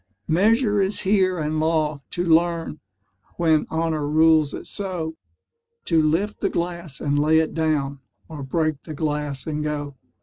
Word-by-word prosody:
Measure 210 +3 +3
is 195 +2 0
here 190 -2 +2
and 155 0 -1
law, 155 -2 0
to 175 - -1
learn, 165 -1 +1 0.6
When 160 -3 +2
honour 160 -2 -1
rules 155 -1 +4
it - - -7
so, 175 -5 -4 0.7
To 165 -2 +3
lift 165 +7 0
the - - +1
glass 170 -4 -4
and 145 -1 0
lay 155 +2 +4
it 160 0 +1
down 150 -4 -1 0.3
Or 155 -3 -8
break 155 +2 -1
the 155 - -8
glass 150 -2 -2
and 150 -1 -3
go. 145 -1 -3
160 Hz, 155 wpm, -23 LUFS, 150-170 Hz, 0.7 s, rules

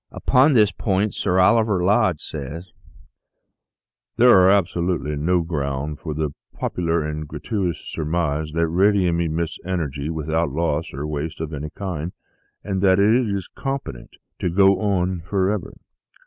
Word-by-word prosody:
Upon 135 +4 +3
this 105 -5 +4
point 100 0 0
Sir 90 -2 0
Oliver 105 -1 +3
Lodge 100 -4 +2
says: 80 +5 -7 0.7
" 120 +3 -60
There 115 -6 +7
is - - +6
absolutely 85 -5 0
no 85 +4 +1
ground 75 -2 -3
for 75 -3 -5
the 75 -1 -1 0.3
popular 85 -2 -1
and 75 0 -4
gra 75 0 -7
tuitous 95 -2 -2
surmise 80 -1 -2
that 85 0 +1
radium 90 0 +2
emits 85 0 -2
energy 75 -5 -3
without 80 0 -1
loss 80 +2 -1
or 70 +3 -5
waste 75 +2 -4
of 80 0 -5
any 75 +1 -5
kind, 90 -2 -5 0.5
and 95 -2 -2
that 95 -1 +4
it 100 +3 +4 0.2
is 100 -3 -3
competent 135 - -6 0.2
to 90 - 0
go 95 +2 +4
on 95 -3 0
for 95 +3 0
ever. 105 -4 -4
85 Hz, 150 wpm, -22 LUFS, 75-100 Hz, 0.7 s, There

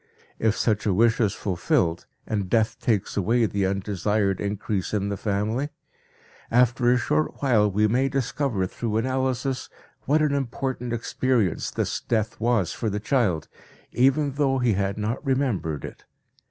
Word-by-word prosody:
If 110 -1 +1
such 110 -2 +1
a 95 - +2
wish 115 +3 +3
is 105 -3 +1
fulfilled, 85 -2 0 0.2
and 100 -4 -2
death 110 +1 +1
takes 105 -4 0
away 115 +4 +2
the 100 -2 0
undesired 100 0 0
increase 100 0 -2
in 100 -1 -1
the 100 - -2
family, 110 +7 -1 0.8
after 120 +1 +3
a 125 - +4
short 155 +5 0
while 110 -6 +4
we 105 +2 +2
may 130 +5 +2
discover 135 -5 -1
through 110 +3 -3
analysis 130 +1 -1 0.4
what 155 +3 +3
an 150 -2 +2
important 130 -2 -2
experience 120 -4 0
this - - -2
death 110 -2 -1
was 115 -7 +1
for 115 - -2
the 105 +1 -2
child, 105 - 0 0.4
even 135 +3 +3
though 135 -1 +1
he 125 -3 +2
had 100 +1 -1
not 110 +5 -2
remembered 130 - -1
it. - - -10
115 Hz, 155 wpm, -25 LUFS, 100-130 Hz, 0.8 s, a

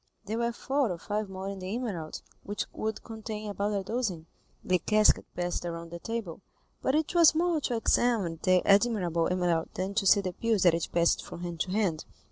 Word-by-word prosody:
There 220 +3 -2
were 235 0 +1
four 265 +1 0
or 175 - -3
five 210 +3 -3
more 190 0 -6
in 195 -1 -5
the 185 +3 -4
emerald, 195 -11 -4 0.2
which 205 -1 -3
would 220 0 -3
contain 215 -2 -6
about 205 +1 -1
a - - -5
dozen. 195 -6 -2 0.4
The 185 -1 +2
casket 215 +4 +3
passed 175 0 -2
around 170 -1 -5
the 170 - -6
table, 215 -5 -5 0.4
but 265 - +1
it 310 +2 0
was 335 -2 +6
more 335 -1 +1
to 245 - -1
examine 225 -7 +1
the 185 -1 +3
admirable 195 -6 +3
emerald 175 -3 0
than 190 +2 -2
to 200 -1 +1
see 200 - +6
the 185 -2 -4
pills 225 -2 +1
that 175 -3 +6
it 165 -1 -1
passed 170 0 +2
from - - -9
hand 175 -2 -5
to 185 - -1
hand. 190 -7 0
200 Hz, 205 wpm, -29 LUFS, 175-225 Hz, 0.4 s, was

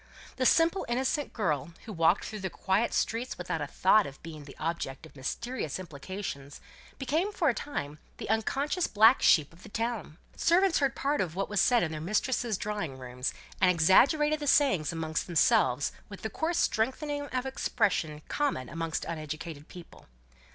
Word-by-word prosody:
The 255 -1 +3
simple 330 +4 +3
innocent 265 +4 0
girl, 155 - -2
who 215 - -7
walked 165 +2 +3
through 215 - -6
the 190 -1 -3
quiet 195 +6 0
streets 235 +3 -1
without 175 -3 -3
a 145 - -2
thought 195 +7 +3
of 135 -1 -11
being 155 -3 -9
the 140 - -12
object 160 -3 -3
of 160 - -16
mysterious 155 - -4
implications, 155 -3 -7 0.4
became 315 +9 0
for 335 -7 +1
a - - +2
time 150 - -5 0.2
the - - -6
unconscious 275 - 0
black 220 +4 +5
sheep 155 -1 +4
of 170 - -18
the - - -12
town. 225 -7 -3 0.2
Servants 360 +1 +3
heard 275 -4 +1
part 285 +2 0
of 170 -3 -3
what 195 - -2
was 205 -3 +2
said 245 -2 +4
in 160 - -2
their 155 -1 -5
mistresses' 215 +4 0
drawing 205 -11 -4
rooms, 125 0 -4 0.3
and 185 - +6
exaggerated 280 - +4
the 295 - -4
sayings 260 - +3
amongst 160 -1 -3
themselves 170 - +3 0.2
with 200 - -10
the 220 - -3
coarse 330 - -1
strengthening 285 +5 0
of 255 -1 -3
expression 200 - -1
common 275 - -2
with 165 -1 -2
uneducated 155 -1 -6
people. 175 -2 -13
200 Hz, 170 wpm, -29 LUFS, 160-260 Hz, 0.4 s, and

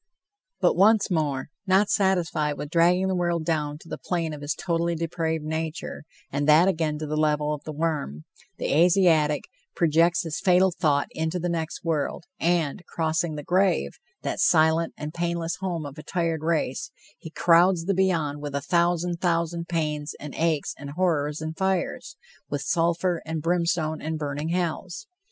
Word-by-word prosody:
But, - - +3
once 205 +1 +4
more; 150 -6 -1 0.2
not 195 +2 +3
satisfied 170 -6 +1
with 145 - -6
dragging 175 +3 +3
the 190 - 0
world 175 -2 0
down 150 -3 -1
to - - -15
the - - -6
plane 165 -3 -2
of 150 - -8
his 145 +1 -2
totally 170 -1 -1
depraved 160 -1 -2
nature, 160 -1 -4 0.3
and 145 +2 0
that 160 +4 +7
again 160 -5 0
to 155 - -4
the 155 0 -3
level 150 -1 +1
of 150 - -6
the 155 - -4
worm, 150 - -2 0.3
the - - -1
Asiatic 165 -3 +4 0.3
projects 170 +1 +3
his 160 -2 -4
fatal 185 0 +4
thought 145 -4 +1
into 160 +2 -2
the 175 0 -2
next 165 -1 -3
world 165 +1 -1 0.2
and, 170 0 0
crossing 160 0 -1
the 150 - -6
grave, 185 +1 +1 0.2
that - - -3
silent 160 0 +3
and 150 +1 -6
painless 170 -1 -2
home 175 -5 -3
of 140 +1 -8
a - - -9
tired 165 -4 -1
race, 155 -5 -1 0.3
he 160 - -9
crowds 170 +1 +4
the 195 - +1
beyond 165 -6 0
with 145 -1 -5
a - - +1
thousand 175 +2 +1
thousand 170 -1 0
pains 150 -3 -2
and 150 -1 -8
aches 160 -3 0
and 140 -1 -7
horrors 155 -5 0
and 160 0 -4
fires 190 - -1 0.3
with 145 -1 -2
sulphur 170 +2 +1
and 160 -1 -4
brimstone 170 -2 0
and 160 0 -3
burning 145 +1 -3
hells. 180 +4 -2
165 Hz, 170 wpm, -25 LUFS, 150-175 Hz, 0.3 s, that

